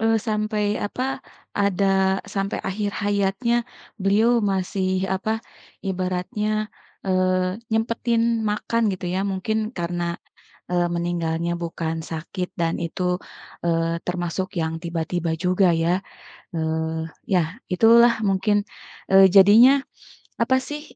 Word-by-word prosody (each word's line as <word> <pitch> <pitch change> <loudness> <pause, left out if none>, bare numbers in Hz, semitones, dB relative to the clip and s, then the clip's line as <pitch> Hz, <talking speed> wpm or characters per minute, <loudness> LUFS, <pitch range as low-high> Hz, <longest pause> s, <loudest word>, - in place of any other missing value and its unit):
eee, 225 0 +3
sampai 215 -1 -1
apa 205 +5 -3 0.5
ada, 195 -1 +2
sampai 195 0 -1
akhir 205 +1 -2
hayatnya 205 +3 +1 0.5
beliau 205 +4 +4 0.2
masih 190 0 -1
apa, 215 +4 -1 0.4
ibaratnya 195 +3 -2 0.4
eee, 185 0 +1 0.2
nyempetin 230 0 +1
makan 230 +2 -1
gitu 185 - -6
ya 190 +1 0
mungkin 215 +3 -2
karena, 175 -3 -3 0.7
eee, 175 -1 +2
meninggalnya 170 -1 -1
bukan 165 -1 -3 0.2
sakit 175 +3 -4
dan 165 -1 -1
itu, 180 +2 -1 0.5
eee, 165 0 +1
termasuk 180 +1 -2
yang 160 0 -1
tiba-tiba 170 0 -2
juga 185 +1 +3
ya. 170 +3 +1 0.5
Eee, 160 0 -2 0.2
ya 180 - +5 0.3
itulah 235 +5 +6 0.2
mungkin, 195 +2 +2 0.5
eee, 195 0 +8
jadinya 205 +6 +8 0.7
apa 260 +3 +3
sih, 295 0 -5
190 Hz, 110 wpm, -23 LUFS, 175-215 Hz, 0.7 s, eee